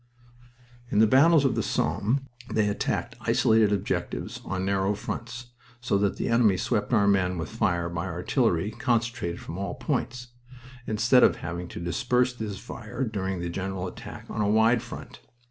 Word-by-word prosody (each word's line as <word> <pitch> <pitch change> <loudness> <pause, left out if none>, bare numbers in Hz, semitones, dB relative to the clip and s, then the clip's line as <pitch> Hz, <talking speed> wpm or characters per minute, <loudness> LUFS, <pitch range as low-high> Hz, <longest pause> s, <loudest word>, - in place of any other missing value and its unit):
In - - -1
the 110 - +7
battles 140 +6 +5
of 135 - +3
the - - 0
Somme 120 +7 0 0.3
they 110 -1 +2
attacked 100 - -2
isolated 110 -2 +3
objectives 100 -2 -2
on 95 0 -3
narrow 100 +1 +1
fronts, 120 +2 -6 0.3
so 115 -5 0
that 100 -1 +1
the - - -2
enemy 115 -5 +4
swept - - -1
our 100 -1 +4
men 90 -2 +2
with 80 -4 -4
fire 85 +5 0
by 85 +1 -3
artillery 90 - 0
concentrated 115 -6 -1
from 85 - -7
all 100 -3 -3
points, 125 0 -3 0.6
instead 115 +4 +4
of - - +5
having 85 +1 -5
to - - -8
disperse 125 +7 +1
his 110 -4 -5
fire 120 +7 -6
during 95 -6 -3
a 85 - -2
general 95 +1 -3
attack 90 - -8
on - - -3
a 100 - +2
wide 110 +2 +4
front. - - -9
105 Hz, 165 wpm, -27 LUFS, 95-120 Hz, 0.6 s, the